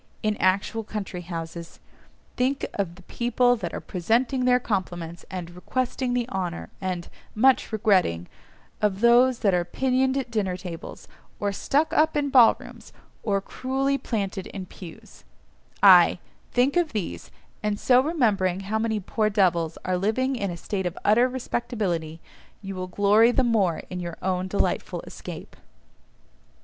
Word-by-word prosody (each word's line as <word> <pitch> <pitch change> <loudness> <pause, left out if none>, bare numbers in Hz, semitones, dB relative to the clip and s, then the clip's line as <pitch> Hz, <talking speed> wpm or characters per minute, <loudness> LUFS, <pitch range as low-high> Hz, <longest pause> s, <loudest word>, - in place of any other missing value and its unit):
in 215 -1 +1
actual 195 +4 +1
country 200 -4 -5
houses; 165 -1 -7 0.6
think 265 +2 0
of 185 -4 -3
the 185 - -16
people 245 +4 +1
that 225 - -5
are - - -4
"presenting 240 +8 0
their 250 0 +4
compliments," 175 -7 -4
and 180 -2 -6
"requesting 250 +7 -2
the 240 -1 0
honour," 175 - -4
and 185 -2 -3 0.3
"much 255 +3 +3
regretting,"—of 195 - -1
those 240 +1 +5
that 200 -4 +3
are 175 -1 +2
pinioned 260 +7 0
at 260 -3 -3
dinner 195 -5 -1
tables; 180 -3 -8 0.3
or 205 -1 0
stuck 290 +10 0
up 315 0 +3
in 285 -1 0
ballrooms, 245 -4 +3 0.3
or 200 -3 0
cruelly 270 +5 -1
planted 200 -7 -3
in 190 -2 -7
pews—ay, 175 -2 +1 0.3
think 250 +3 +2
of 345 -3 +1
these, 170 - -4 0.3
and 210 -1 -1
so 250 0 +5
remembering 210 - +1
how 210 +3 -2
many 220 -1 0
poor 215 +2 0
devils 175 -5 +1
are 185 -1 0
living 255 +7 0
in 200 -5 -2
a 175 - -5
state 190 +2 -3
of 175 - -6
utter 240 +5 +4
respectability, 205 -10 -3 0.4
you 195 0 -5
will 185 -1 -5
glory 205 +4 +4
the 260 - +2
more 205 -8 +1
in 180 - -4
your 170 -1 -6
own 185 0 -1
delightful 200 - -1
escape. - - -9
205 Hz, 145 wpm, -25 LUFS, 180-245 Hz, 0.6 s, those